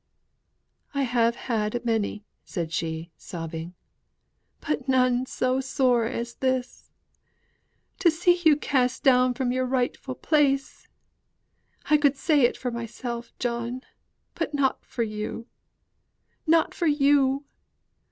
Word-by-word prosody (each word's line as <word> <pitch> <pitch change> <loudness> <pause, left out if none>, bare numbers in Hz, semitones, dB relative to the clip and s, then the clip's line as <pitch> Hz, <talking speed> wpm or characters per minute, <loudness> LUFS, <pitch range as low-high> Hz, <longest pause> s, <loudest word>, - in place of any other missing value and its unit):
"I 280 - +1
have 235 -2 +2
had 215 -3 -2
a 240 - -1
many," 215 -2 -1 0.2
said 170 -3 -4
she, 165 0 -3
sobbing, 165 0 -7 0.8
"but 275 -3 -3
none 255 -1 +3
so 255 +1 0
sore 255 -3 +2
as 235 0 -4
this. 260 -1 -2 1.1
To 360 - +5
see 350 +2 +2
you 315 -3 +7
cast 260 -4 0
down 255 -1 +4
from 250 -1 0
your 255 0 0
rightful 255 +1 -1
place! 280 -1 +1 1.0
I 300 - +7
could 285 -2 +2
say 295 0 +3
it 245 - +3
for 250 - -3
myself, 235 0 -5
John, 235 +1 -3 0.5
but 295 - -3
not 270 -2 +1
for 235 - -3
you. 215 +1 -5 1.0
Not 330 +3 +3
for 345 - -1
you! 280 -1 +3
255 Hz, 125 wpm, -26 LUFS, 235-275 Hz, 1.1 s, you